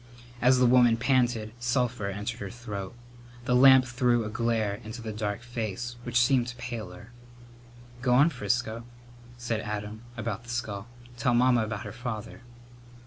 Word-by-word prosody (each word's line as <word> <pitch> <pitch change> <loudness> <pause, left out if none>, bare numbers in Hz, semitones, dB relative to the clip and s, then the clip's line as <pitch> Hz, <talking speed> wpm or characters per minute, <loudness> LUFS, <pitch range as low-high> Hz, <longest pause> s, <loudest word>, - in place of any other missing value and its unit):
As 125 +1 +5
the 125 - +4
woman 120 -2 +5
panted 120 -3 +1
sulphur 120 -3 0
entered 105 +4 -4
her - - -5
throat. 105 -4 -7 0.5
The 125 -1 +2
lamp 130 0 +8
threw 120 -2 +1
a 105 - -5
glare 110 -3 -1
into 110 +2 -7
the 115 -1 -5
dark 105 +1 -3
face, 120 0 -4
which 120 0 +1
seemed 125 0 +2
paler. 115 -3 -7 0.9
"Go 125 -1 +3
on, 145 +6 +5
Frisco," 115 0 -2 0.5
said 120 -2 -2
Adam, 105 +1 -5 0.2
about 115 -2 -3
the 120 - -15
skull, 110 -3 -4 0.3
"tell 120 +1 +2
Mamma 125 -1 +4
about 110 -1 -5
her - - -6
father." 120 -2 -6
120 Hz, 150 wpm, -28 LUFS, 110-125 Hz, 0.9 s, lamp